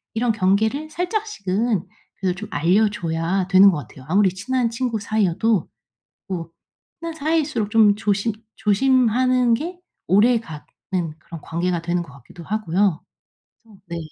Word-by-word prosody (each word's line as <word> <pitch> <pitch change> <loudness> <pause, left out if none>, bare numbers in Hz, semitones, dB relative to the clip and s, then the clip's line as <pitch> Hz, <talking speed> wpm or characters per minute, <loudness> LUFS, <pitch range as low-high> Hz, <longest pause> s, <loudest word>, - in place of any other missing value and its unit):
이런 235 +1 +2
경계를 220 +9 +1
살짝씩은 240 - -2 0.3
그래도 185 -2 -1
좀 215 +3 -8
알려줘야 175 +1 +1
되는 195 +1 +7
것 165 - -2
같아요 130 -1 -14
아무리 195 0 +4
친한 235 +4 -1
친구 230 -2 -2
사이여도. 205 -1 +1 0.6
뭐 170 -4 -5 0.5
친한 335 -1 -5
사이일수록 300 -8 -1
좀 215 -3 +5
조심 205 +1 0 0.2
조심하는 250 +2 +3
게 350 +7 -6 0.3
오래가는 205 -6 +2 0.6
그런 165 -1 -10
관계가 170 +1 -2
되는 175 +1 -1
것 140 - -14
같기도 140 +6 -13
하고요 195 -3 0 0.9
네. 170 -1 -4
205 Hz, 295 characters per minute, -22 LUFS, 180-240 Hz, 0.9 s, 되는